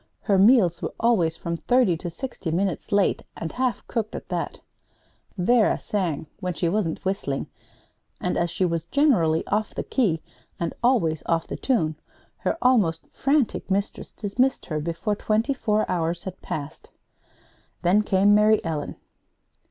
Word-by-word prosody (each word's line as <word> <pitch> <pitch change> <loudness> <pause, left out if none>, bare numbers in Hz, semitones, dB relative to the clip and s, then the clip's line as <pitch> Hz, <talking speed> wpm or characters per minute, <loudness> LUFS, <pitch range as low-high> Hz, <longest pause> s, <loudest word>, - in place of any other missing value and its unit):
Her 200 -4 +2
meals 200 -5 +5
were - - -4
always 185 -9 +2
from 170 0 -3
thirty 245 -4 +3
to 175 - -5
sixty 195 -1 -6
minutes 180 +1 -1
late, 200 -1 +2 0.2
and 165 - -4
half 255 -1 -1
cooked 220 -2 -2
at - - -8
that. - - -3 0.8
Vera 220 +5 +3
sang 180 -8 -2
when 180 -3 -3
she 170 - 0
wasn't 175 -2 -1
whistling 185 -8 -1 0.7
and 180 - -1
as 170 0 +1
she 185 - 0
was 165 -2 -1
generally 175 - +2
off 210 +1 -1
the - - -2
key, 185 - 0 0.4
and 170 - -2
always 205 - +2
off 165 -1 +1
the - - -5
tune, 160 - 0 0.4
her - - -1
almost 205 -11 +3
frantic 275 -7 +1
mistress 200 +1 -2
dismissed 250 +5 0
her 155 -2 -2
before 170 +7 -2
twenty 220 +6 0
four 215 -5 +1
hours 170 -1 -1
had 190 -1 -7
passed. 145 -1 -6 0.9
Then 185 +5 +4
came 200 0 +3
Mary 215 +1 +5
Ellen. 155 -3 -3
190 Hz, 150 wpm, -24 LUFS, 165-220 Hz, 0.9 s, meals